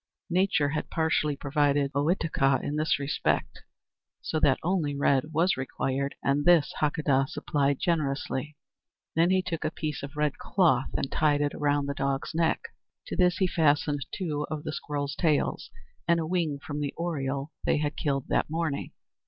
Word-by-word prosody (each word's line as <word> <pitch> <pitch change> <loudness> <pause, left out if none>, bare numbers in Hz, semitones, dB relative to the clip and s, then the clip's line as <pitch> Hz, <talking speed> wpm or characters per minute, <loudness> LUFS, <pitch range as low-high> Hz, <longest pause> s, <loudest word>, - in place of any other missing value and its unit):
Nature 180 -5 +2
had 155 - -3
partially 160 -2 +1
provided 145 0 +1
Ohitika 145 -3 +2
in 145 - -2
this 155 +1 +1
respect, 140 +1 -1 0.6
so 155 - -2
that 135 -3 +4
only 165 -5 0
red 140 -1 +3
was 165 +4 +2
required 135 +1 -2
and 140 +1 +2
this 170 -2 +4
Hakadah 145 -3 +2
supplied 140 -1 0
generously. 150 -4 -1 0.6
Then 165 +2 +4
he 185 0 +3
took 165 -3 -3
off 155 - +1
a - - -24
piece 150 -3 -3
of 140 +2 -8
red 150 -2 0
cloth 155 -9 +2
and 135 - -2
tied 150 -2 +2
it 145 0 0
around 145 -1 +1
the 140 - -2
dog's 135 -1 -2
neck; 165 0 +1 0.4
to - - -5
this 180 -1 +3
he 190 - +2
fastened 150 -4 +2
two 150 -6 -3
of 150 -1 -4
the 155 - -4
squirrels' 145 -2 -3
tails 155 -4 0 0.4
and 170 0 +4
a 160 - -1
wing 165 -4 0
from 145 +1 -6
the 145 -1 -3
oriole 140 -4 -2
they - - +3
had 150 0 -1
killed 135 -3 -1
that - - +1
morning. 160 -3 -2
150 Hz, 170 wpm, -28 LUFS, 140-160 Hz, 0.6 s, that